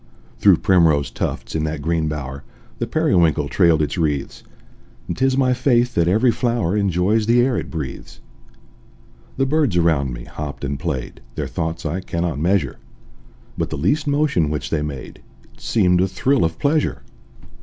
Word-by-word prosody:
Through - - +6
primrose 80 -6 +3
tufts, - - -4
in 80 - -1
that 75 -2 -4
green 80 0 0
bower, 70 -3 -5 0.4
The - - -2
periwinkle 80 -4 +2
trailed 85 -4 +3
its 75 - -3
wreaths; 75 -4 -2 0.7
And - - -3
'tis 135 0 +1
my 130 -2 +3
faith 125 -1 +2
that 85 -1 +2
every 110 +7 +3
flower 115 -6 0
Enjoys 100 +2 +1
the 120 +1 +4
air 125 0 +2
it - - -3
breathes. 75 -6 -7 1.2
The 135 - +2
birds 140 - +1
around 80 -6 +2
me - - -7
hopped 75 +1 -7
and 70 0 -3
played, 70 -8 -4
Their - - -2
thoughts 80 +1 -4
I 80 +5 -1
cannot 85 -4 -2
measure: 85 -4 0 0.8
But - - -1
the - - -4
least 145 - 0
motion 140 - +1
which 75 -1 -4
they 80 - 0
made 70 -4 -7 0.3
It - - -22
seemed 90 -5 +2
a 95 - +2
thrill 135 +8 +1
of 80 0 -2
pleasure. 150 +1 0
85 Hz, 165 wpm, -20 LUFS, 75-120 Hz, 1.2 s, Through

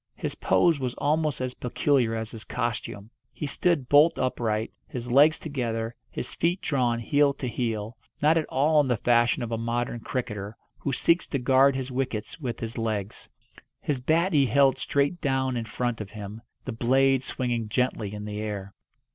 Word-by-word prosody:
His - - -3
pose 165 -4 +2
was 125 -2 -3
almost 150 -1 0
as 130 -1 -2
peculiar 125 -2 +1
as 110 0 -4
his 110 -1 -8
costume. 115 -2 -4 0.2
He - - -5
stood 145 -1 0
bolt 150 +4 +5
upright, 110 -3 -1
his 125 -1 -6
legs 145 +5 +6
together, 115 -6 -3 0.2
his 120 - -5
feet 175 +3 0
drawn 125 -8 +1
heel 145 +4 +3
to 130 - -4
heel; 115 -2 -3 0.2
not 155 +2 +4
at 160 -2 +1
all 150 +3 +3
in 140 - -1
the 125 -2 +1
fashion 120 +2 +2
of 115 - -5
a 115 - -1
modern 120 +1 -2
cricketer, 110 -4 -4 0.2
who 140 - -2
seeks 170 +6 +2
to 140 - -1
guard 135 +1 +4
his 130 0 -4
wickets 125 -1 -3
with 125 -6 -4
his 115 +1 -4
legs. 110 -3 -3 0.5
His 140 -4 -2
bat 165 +7 +2
he 140 -3 +4
held 140 0 +4
straight 145 +5 0
down 130 -2 0
in 115 -1 -2
front 120 +1 -2
of 105 - -7
him, 105 +1 -8 0.2
the 130 - -3
blade 130 +3 +3
swinging 120 -4 -2
gently 115 -4 0
in 105 0 -6
the 105 0 -5
air. 100 -2 -5
125 Hz, 180 wpm, -26 LUFS, 115-140 Hz, 0.5 s, legs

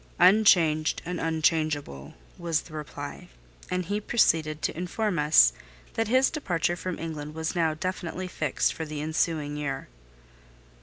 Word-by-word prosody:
"Unchanged 175 -5 +5
and 180 +1 -3
unchangeable," 155 - -1 0.2
was 165 -2 -1
the 160 - -15
reply. 145 -1 -7 0.4
And 180 0 -1
he 205 +4 -2
proceeded 160 -9 +1
to - - -1
inform 180 +2 -2
us 150 - +6 0.4
that 225 -1 0
his 260 +4 +3
departure 175 - -1
from 180 0 -4
England 155 -2 -6
was 160 0 -2
now 165 -2 +1
definitively 185 +1 -4
fixed 155 -5 0
for 160 - -5
the 155 -1 -5
ensuing 155 -1 -1
year. 140 - -4
160 Hz, 140 wpm, -27 LUFS, 150-180 Hz, 0.4 s, us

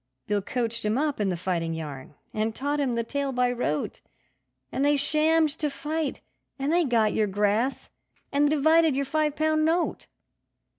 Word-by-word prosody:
Bill 205 -1 0
coached 230 +1 -3
him 215 +2 +1
up 295 -2 0
in 205 -2 +1
the 180 - -1
fighting 170 -2 -2
yarn, 145 -3 -7 0.2
and 215 +1 -1
taught 290 +2 -1
him 260 -4 0
the 230 - 0
tale 280 +3 -2
by 250 -1 +1
rote, 195 -12 -2 0.7
And 270 - -1
they 290 0 +4
shammed 310 +2 +3
to 300 - 0
fight, 300 0 -3 0.4
and 280 +3 -1
they 350 -1 +3
got 225 -5 +2
your 215 - +2
grass 210 +6 0 0.4
and 285 +1 +3
divided 315 0 +4
your 280 +1 0
five 300 +1 0
pound 310 0 +2
note. 330 +2 0
270 Hz, 170 wpm, -26 LUFS, 215-305 Hz, 0.7 s, they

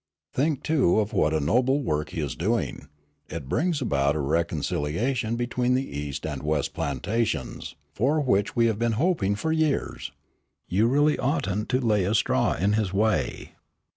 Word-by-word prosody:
"Think, 145 +1 0
too, 135 - +3
of 105 0 -1
what 75 - +2
a 80 - +1
noble 125 - +2
work 75 - -1
he 80 - -4
is 75 - -2
doing. 105 -5 -2 0.4
It 75 -4 -6
brings 160 - 0
about 70 - +1
a - - -1
reconciliation 85 - -1
between 125 +1 0
the 135 +1 -1
east 70 -1 -4
and 75 -4 -4
west 75 0 -1
plantations, 80 - -2 0.2
for 140 - +1
which 105 -8 +1
we 115 - +4
have 110 -2 0
been 120 -1 +1
hoping 115 - +1
for 160 +10 -2
years. 160 -3 -1 0.6
You 105 +6 +2
really 145 +4 +3
oughtn't 105 - -1
to 130 - +2
lay 110 -6 +2
a 105 +4 +1
straw - - +2
in 100 +5 +1
his 105 -3 0
way." 110 +3 0
110 Hz, 170 wpm, -26 LUFS, 80-130 Hz, 0.6 s, we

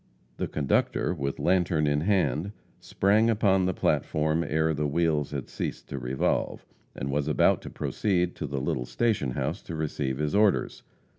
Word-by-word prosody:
The - - -2
conductor, 70 -3 0
with 70 0 -3
lantern 90 -4 +2
in 75 0 +1
hand, 90 -1 +1 0.3
sprang 105 +4 +2
upon 95 -4 +3
the 95 - 0
platform 80 +2 +1
ere 80 +1 +1
the 75 0 -1
wheels 75 -1 +1
had 70 -3 -5
ceased - - -5
to - - -4
revolve, 65 +2 -1 0.3
and 70 +2 -3
was 70 +1 0
about 75 - +3
to - - -8
proceed 90 -4 -1
to 75 - -3
the 70 0 -3
little 65 -2 -2
station 105 - 0
house - - -2
to 85 - -7
receive 70 -4 -2
his 75 0 -1
orders. 105 -1 +2
80 Hz, 165 wpm, -27 LUFS, 70-95 Hz, 0.3 s, upon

